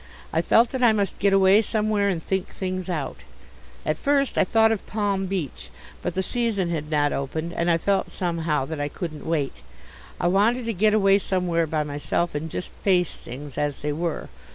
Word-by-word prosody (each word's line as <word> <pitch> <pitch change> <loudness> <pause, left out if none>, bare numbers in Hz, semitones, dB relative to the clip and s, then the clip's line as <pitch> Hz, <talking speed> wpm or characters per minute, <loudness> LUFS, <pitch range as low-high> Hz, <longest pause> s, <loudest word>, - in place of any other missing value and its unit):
I - - +3
felt 230 +1 +4
that 260 - -3
I 235 -3 +6
must 200 -3 -1
get 200 +1 +3
away 195 +2 +6
somewhere 215 -2 0
and 175 -5 -1
think 190 0 -1
things 185 -1 -4
out. 155 -6 -3 0.7
At 155 0 -1
first 280 -1 +1
I - - +4
thought 225 +3 +4
of 220 - -2
Palm 200 -2 -1
Beach, 180 -8 -4 0.3
but 175 - -3
the 190 - 0
season 215 -6 0
had 155 -2 -3
not 145 -2 +2
opened 160 +5 -3
and 170 0 0
I 165 - +4
felt 195 +3 0
somehow 165 -5 -1
that 155 +1 -5
I 145 - 0
couldn't 155 -1 -6
wait. 150 -4 0 0.7
I - - -1
wanted 215 +7 +3
to 230 - -1
get 210 +2 +3
away 195 -1 +5
somewhere 175 -4 0
by 155 0 0
myself 145 +4 -1
and 150 +2 -3
just 180 - -5
face 180 -4 +1
things 140 +3 -8
as 145 -1 -1
they 150 0 -1
were. 165 +1 -3
180 Hz, 200 wpm, -24 LUFS, 155-200 Hz, 0.7 s, I